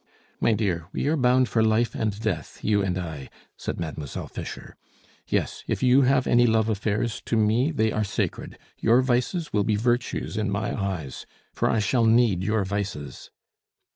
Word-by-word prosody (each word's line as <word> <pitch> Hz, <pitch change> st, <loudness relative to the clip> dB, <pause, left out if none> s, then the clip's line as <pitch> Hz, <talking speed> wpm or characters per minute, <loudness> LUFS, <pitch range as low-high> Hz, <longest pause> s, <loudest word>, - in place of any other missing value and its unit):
"My 115 Hz, -, +3 dB
dear, 90 Hz, -7 st, -1 dB
we -, -, -2 dB
are 160 Hz, -, +2 dB
bound 125 Hz, -2 st, +3 dB
for 115 Hz, -, +1 dB
life 110 Hz, +1 st, +2 dB
and 105 Hz, -2 st, -2 dB
death, 100 Hz, -9 st, -3 dB
you 105 Hz, -1 st, +2 dB
and 95 Hz, -2 st, -1 dB
I," 80 Hz, -7 st, -6 dB, 0.3 s
said -, -, -5 dB
Mademoiselle 80 Hz, -4 st, -5 dB
Fischer. -, -, -8 dB, 0.5 s
"Yes, -, -, -1 dB
if -, -, -2 dB
you 130 Hz, +2 st, +5 dB
have 130 Hz, 0 st, +3 dB
any 120 Hz, 0 st, +4 dB
love 110 Hz, -1 st, +2 dB
affairs, 105 Hz, +2 st, -1 dB
to 115 Hz, -, 0 dB
me 110 Hz, +6 st, +2 dB
they 110 Hz, -8 st, +1 dB
are 110 Hz, -, 0 dB
sacred. 100 Hz, -, -3 dB, 0.2 s
Your 115 Hz, +3 st, +4 dB
vices 130 Hz, +6 st, -1 dB
will 105 Hz, -, +2 dB
be 105 Hz, +1 st, +1 dB
virtues 120 Hz, +1 st, -1 dB
in 105 Hz, -1 st, 0 dB
my 100 Hz, +2 st, -2 dB
eyes. 95 Hz, -, -4 dB, 0.3 s
For -, -, 0 dB
I -, -, +2 dB
shall 115 Hz, +3 st, +2 dB
need 110 Hz, -5 st, +4 dB
your 105 Hz, +1 st, 0 dB
vices!" 95 Hz, -7 st, -5 dB
110 Hz, 175 wpm, -25 LUFS, 100-120 Hz, 0.5 s, you